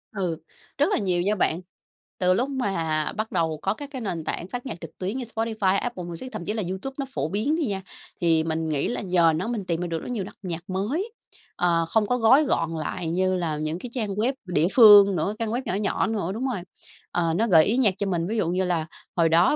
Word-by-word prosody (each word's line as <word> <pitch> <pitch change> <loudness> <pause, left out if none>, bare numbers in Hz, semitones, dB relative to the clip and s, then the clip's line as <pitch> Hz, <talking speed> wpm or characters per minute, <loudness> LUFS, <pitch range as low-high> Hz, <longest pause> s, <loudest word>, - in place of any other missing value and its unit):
Ừ, 175 -5 -1 0.4
rất 290 - +4
là - - +2
nhiều 180 -4 +1
nha 205 +3 +1
bạn. 175 -2 +1 0.6
Từ 185 0 +3
lúc 255 +8 0
mà 165 - -1
bắt 220 +1 -2
đầu 160 -2 0
có 195 - +1
các 285 +4 -9
cái 260 -3 -5
nền 170 -6 -3
tảng 170 - -3
phát 245 +5 -6
nhạc 170 -9 -6
trực 165 - -10
tuyến 195 +7 -3
như 255 - -3
Spotify, 220 -4 +1
Apple 235 -8 -4
Music, 175 +9 -7
thậm 205 -6 -6
chí 210 - -2
là 215 -3 -2
YouTube 190 +9 -4
nó 275 - -1
phổ - - -1
biến 225 +11 0
đi 325 -4 0
nha, 195 -3 -2 0.4
thì 165 -2 +3
mình 160 0 -2
nghĩ 145 -2 0
là 245 - -2
nhờ 175 -4 +3
nó 185 +7 -2
mình 220 -5 -3
tìm 170 -1 -1
ra 175 - -2
được 165 -1 -2
rất 250 - -7
nhiều 215 -6 -2
đặc 195 - -10
nhạc 175 +1 -5
mới, 270 - -2 0.4
ờ, 170 -2 +2
không 215 0 +2
có 250 - +1
gói 255 +6 +6
gọn 165 -10 0
lại 160 +2 -3
như 185 +3 +1
là 165 -4 -1
những 155 +3 -3
cái 245 - -7
trang 220 -5 -2
web 235 +6 +1
địa 170 -2 +2
phương 205 -5 +9
nữa, 175 +6 0
trang 225 -1 -1
web 245 +3 -1
nhỏ - - -2
nhỏ 205 0 0
nữa 205 -5 -2
đúng 245 +5 -3
rồi. 185 - -4 0.5
Ờ, 165 -2 +1
nó 225 +6 +1
gợi 160 -5 +6
ý 230 +5 +1
nhạc 215 -7 +4
cho 200 - -1
mình, 170 -2 -1
ví 225 +2 -2
dụ 170 -5 +1
như 185 +1 +1
là 170 -3 0 0.3
hồi 165 -2 +3
đó 170 - +4
190 Hz, 255 wpm, -25 LUFS, 170-225 Hz, 0.6 s, phương